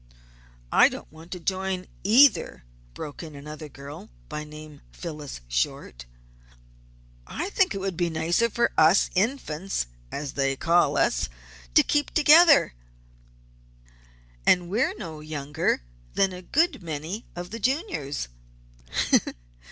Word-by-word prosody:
"I - - +6
don't - - -9
want 160 +2 -14
to 180 - -6
join 190 +1 -2 0.2
either," 230 - +5 0.3
broke 145 - -7
in 155 -3 -9
another 150 +2 -9
girl, 140 +1 -10 0.2
by 150 - -4
name 150 -1 -11
Phyllis 150 - -7
Short. - - -2 1.2
"I 390 - -4
think 380 - +2
it - - -2
would 190 -3 -3
be 175 -1 +1
nicer 165 +8 +1
for 235 +2 +1
us 160 +5 +5
Infants, 195 - -1 0.3
as 140 -1 -5
they 135 -1 0
call 165 -1 +2
us, - - +1 0.5
to - - +8
keep 295 -1 0
together. 310 - +7 1.7
And 175 - +3
we're 230 +6 +1
no 165 -7 -7
younger 150 - -2 0.3
than 195 -1 +2
a 180 - -8
good 320 - +1
many 165 +6 -5
of 175 0 -7
the 230 - -5
Juniors!" 250 - -2
170 Hz, 125 wpm, -26 LUFS, 150-205 Hz, 1.7 s, to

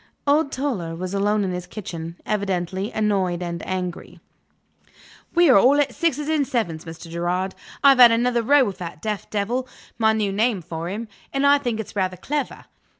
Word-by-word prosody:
Old 290 0 +2
Toller 210 - -3
was 180 +2 -5
alone 205 +1 +1
in 190 - -1
his 180 0 -5
kitchen, 170 -5 -7
evidently 195 -1 -2
annoyed 190 -5 0
and 170 -1 -4
angry. 180 -2 -4 1.2
"We 345 0 +6
are 255 -8 +7
all 270 +7 +5
at 275 -4 +1
sixes 300 -3 -1
and 305 -3 +1
sevens, 185 - -2
Mr. 165 +1 -9
Gerard. 175 +3 -2 0.3
I've 275 -2 +7
had 240 -2 +10
another 240 +1 +2
row 280 +4 +5
with 200 -5 -4
that 170 -4 -7
deaf 210 0 -4
devil 235 +5 -1 0.3
my 220 -1 +4
new 210 -2 0
name 210 -2 0
for 165 0 -5
him, 220 +4 -5 0.2
and 275 0 0
I 285 0 +6
think 240 -5 -2
it's 220 - -7
rather 185 -2 -1
clever. 285 - -4
210 Hz, 180 wpm, -23 LUFS, 180-255 Hz, 1.2 s, had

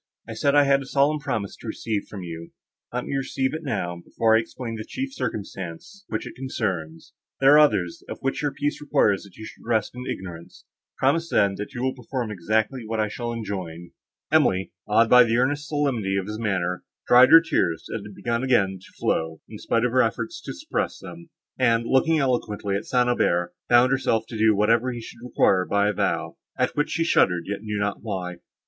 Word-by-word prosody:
I - - -6
said 140 0 +1
I 145 - +7
had 140 0 +3
a 135 - -9
solemn 145 +3 +2
promise 105 -8 -3
to - - -11
receive 110 -1 -3
from 100 -3 -8
you; 85 -1 -8 0.4
let 125 0 -3
me - - -3
receive 135 0 -1
it 160 - -4
now, 90 - -3
before 110 -1 +2
I - - +5
explain 115 0 -6
the 110 - -5
chief 265 - -5
circumstance 100 - -6
which - - -3
it - - -8
concerns; 95 -11 -4 0.3
there 135 +1 +6
are 150 - +8
others, 105 - +2
of - - -5
which 135 - -1
your 145 -1 0
peace 145 +2 -2
requires 105 -9 +2
that 100 -3 -15
you 110 - -8
should - - -12
rest 110 -3 0
in 125 +1 -7
ignorance. 85 -3 -8 0.3
Promise, 165 +5 +1
then, 100 -9 +3
that 115 +7 -6
you 120 - -3
will 130 0 0
perform 125 -2 -4
exactly 110 +6 -1
what 110 0 -3
I 105 -1 +1
shall 120 +3 -4
enjoin." 95 -7 -6 0.4
Emily, 95 +1 +3 0.2
awed 115 +2 +4
by 125 +1 +8
the 115 0 +1
earnest 145 +4 0
solemnity 125 -10 0
of 95 - -1
his 105 +2 -6
manner, 90 -5 -1 0.2
dried 125 +1 +7
her 165 +2 +10
tears, 85 - -1
that 115 - -4
had 105 -1 -11
begun 120 0 -2
again 100 -8 +2
to - - -17
flow, 80 0 -1
in 105 - -10
spite 115 +1 +1
of 125 - 0
her 130 +1 +4
efforts 335 - -2
to - - -6
suppress 305 +1 -3
them; 170 0 -11 0.3
and, 115 -2 +3
looking 160 +6 +3
eloquently 115 -7 -1
at 100 - -3
St. 125 -1 +2
Aubert, 90 -8 +1 0.2
bound 120 +1 +5
herself 115 -4 +1
to 115 - -7
do 110 -1 +4
whatever 115 +5 +2
he 120 - -5
should 120 +1 -11
require 100 -6 +2
by 100 +2 +1
a - - -1
vow, - - -1 0.2
at - - 0
which 150 +1 0
she 165 - 0
shuddered, 90 - +3
yet 100 0 -4
knew 105 -1 -4
not 100 0 -2
why. 90 -5 -4
115 Hz, 210 wpm, -24 LUFS, 100-130 Hz, 0.4 s, her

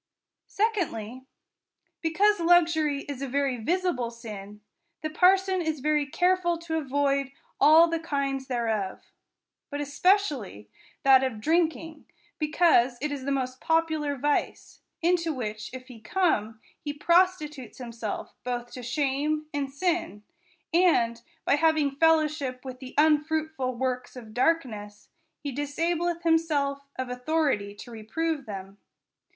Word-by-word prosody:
— - - -62
Secondly, 265 - -2 0.7
because 400 +6 +3
luxury 330 -4 +3
is 280 -2 -7
a 275 - -2
very 275 -1 0
visible 295 -1 0
sin, 210 -3 -9 0.4
the 310 - -2
parson 375 +2 +3
is 315 -3 -2
very 300 +1 +1
careful 355 +2 +1
to 325 -1 -3
avoid 275 -1 0 0.3
all 315 +4 +7
the 330 0 -1
kinds 275 -4 -2
thereof: 225 -6 -2 0.7
but 290 -2 -4
especially 285 - +1 0.4
that 265 -1 +6
of 250 -5 -2
drinking, 320 +2 0 0.3
because 300 -6 +3
it 300 +2 -2
is 275 -2 -5
the 280 - -1
most 260 -1 -2
popular 315 -3 +1
vice; 290 +2 -2 0.2
into 335 -1 +2
which 215 -6 -5
if 255 0 -9
he 245 -3 -12
come, 220 - 0 0.2
he 290 - -3
prostitutes 305 -5 +1
himself 230 -4 -6
both 245 -1 -4
to 250 - -8
shame 290 +4 -1
and 280 -2 -2
sin, 330 - -1 0.5
and, 240 -10 +3 0.2
by - - +3
having 315 -2 +3
fellowship 300 -4 +1
with 255 -1 -7
the 260 0 -10
unfruitful 305 -3 +1
ivorks 255 0 -2
of 225 -4 -10
darkness, 220 -8 -1 0.3
he 285 - -3
disableth 335 +5 -1
himself 290 -4 +1
of 260 - -3
authority 250 -5 -1
to 240 - -11
reprove 275 +7 -3
them. 195 -1 -8
285 Hz, 130 wpm, -27 LUFS, 250-325 Hz, 0.7 s, all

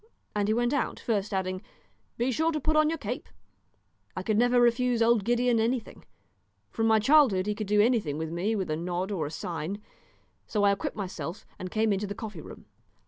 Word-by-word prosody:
And 205 -1 +1
he 215 - +2
went 240 +2 +1
out, 285 - -1
first 210 -4 -1
adding, 185 -1 -2 0.6
"Be 245 +3 +1
sure 320 +6 +1
to 305 - -1
put 310 +2 0
on 310 0 +4
your 325 - -1
cape." 245 +1 -5 0.9
I - - -3
could 215 - 0
never 245 +2 +4
refuse 240 0 +3
old 230 -2 +3
Gideon 240 +1 +2
anything; 230 +1 -2 0.7
from 225 -1 0
my 220 0 +5
childhood 225 -5 +4
he 210 - 0
could 210 0 -5
do 210 +1 +3
anything 215 - +1
with 160 0 -4
me 190 +7 -1
with 190 -6 -2
a - - +1
nod 180 +4 -3
or 165 -7 -1
a - - -5
sign; 170 +4 -4 0.7
so 210 -2 0
I 200 - +5
equipped 200 +2 -3
myself 185 -2 -5
and 185 - -5
came 215 +1 +1
into 200 +1 -2
the 200 - -5
coffee 210 -7 -7
room. - - -12
215 Hz, 205 wpm, -28 LUFS, 190-240 Hz, 0.9 s, my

